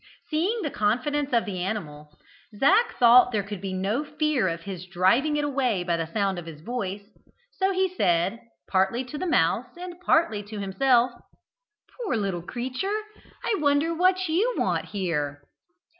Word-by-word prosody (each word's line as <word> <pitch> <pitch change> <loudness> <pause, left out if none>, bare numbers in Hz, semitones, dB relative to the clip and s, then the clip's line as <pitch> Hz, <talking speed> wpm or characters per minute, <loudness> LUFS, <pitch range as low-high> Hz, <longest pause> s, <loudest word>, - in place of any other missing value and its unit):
Seeing 380 +9 0
the 300 - -2
confidence 255 +7 0
of 235 -2 +2
the 190 -4 -4
animal, 150 -7 -5 0.5
Zac 405 - +3
thought 245 +1 +7
there 210 -3 0
could 200 -2 -7
be 195 -1 -4
no 195 +9 -1
fear 305 -7 0
of 165 -1 -3
his 185 -1 -7
driving 215 - +2
it 295 - 0
away 260 -9 0
by 175 -1 0
the 165 -1 -4
sound 195 -2 0
of 170 - -10
his 155 -2 -9
voice, 200 -1 -4 0.5
so 385 0 0
he 380 0 +2
said, 185 - +1 0.3
partly 195 +6 +1
to 290 +4 -7
the 370 - -2
mouse 220 - +2
and 360 0 -8
partly 315 - +2
to 205 +1 -8
himself: 240 +5 +2 0.9
"Poor 325 - 0
little 195 -4 -2
creature, 255 - -3 0.4
I 435 - +1
wonder 290 +2 +2
what 370 +2 +2
you 405 +10 +1
want - - 0
here?" 150 -8 -3
235 Hz, 165 wpm, -26 LUFS, 190-300 Hz, 0.9 s, thought